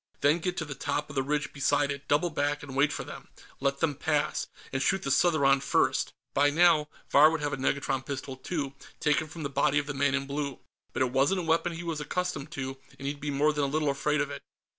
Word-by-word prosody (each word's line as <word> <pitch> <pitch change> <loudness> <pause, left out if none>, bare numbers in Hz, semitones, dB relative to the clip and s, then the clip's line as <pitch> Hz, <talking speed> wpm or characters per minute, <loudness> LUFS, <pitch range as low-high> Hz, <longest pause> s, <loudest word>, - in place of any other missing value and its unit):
Then 145 +4 +4
get 180 +1 -2
to 160 - -2
the 145 - -5
top 145 +2 -2
of 140 - -9
the 135 - +2
ridge 150 +2 -1
beside 145 0 +2
it, 140 0 -6
double 155 +4 +2
back, 145 0 -1
and 135 -2 -8
wait 140 +2 +3
for - - -4
them. - - -10 0.3
Let 140 0 0
them 160 -3 +2
pass, 150 +1 0 0.3
and 135 - 0
shoot 190 +4 +1
the 135 - -1
Southron 140 -4 +4
first. - - +1 0.2
By 145 +1 +4
now, 160 -1 +4 0.2
Vahr 150 +2 +8
would 160 -1 -2
have 145 -1 -1
a - - -1
negatron 135 0 0
pistol 135 -1 -5
too, 140 0 -4 0.3
taken 150 0 +2
from 160 +1 -8
the - - 0
body 140 0 +2
of 145 - +1
the 145 - -4
man 140 0 +2
in 140 0 -1
blue, 140 -1 -3 0.3
but - - +1
it 125 - -1
wasn't 140 +9 +2
a - - -6
weapon 165 +1 +1
he 165 +1 -6
was 165 -3 -3
accustomed 150 -2 -3
to, 135 -2 -5 0.2
and 135 - -5
he'd 140 0 -3
be 150 - -4
more 145 +2 +2
than 145 -1 0
a - - 0
little 150 0 +1
afraid 150 +2 0
of 145 - -2
it. 140 - -6
145 Hz, 250 wpm, -29 LUFS, 140-155 Hz, 0.3 s, Vahr